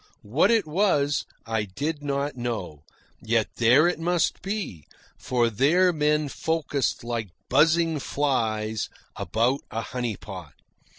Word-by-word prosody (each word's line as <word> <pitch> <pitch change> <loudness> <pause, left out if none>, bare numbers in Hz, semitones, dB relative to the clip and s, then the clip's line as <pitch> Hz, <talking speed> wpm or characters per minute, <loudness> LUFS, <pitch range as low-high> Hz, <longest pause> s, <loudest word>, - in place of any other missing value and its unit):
What 135 - +2
it 225 -3 +3
was, 150 -4 +1 0.2
I 115 -2 -1
did 145 - -3
not 140 0 -2
know; 110 - -4 0.4
yet 110 -1 +1
there 125 +8 +5
it 175 - -1
must 175 +1 0
be, 195 - -4 0.3
for 120 -2 +1
there 155 - +3
men 150 -1 +1
focused 145 -4 -1
like 115 -3 -3 0.2
buzzing 160 +3 +3
flies 110 -7 -1 0.3
about 115 +8 +1
a 115 - -3
honey 120 -1 -3
pot. 90 -7 -9
135 Hz, 125 wpm, -25 LUFS, 110-155 Hz, 0.4 s, there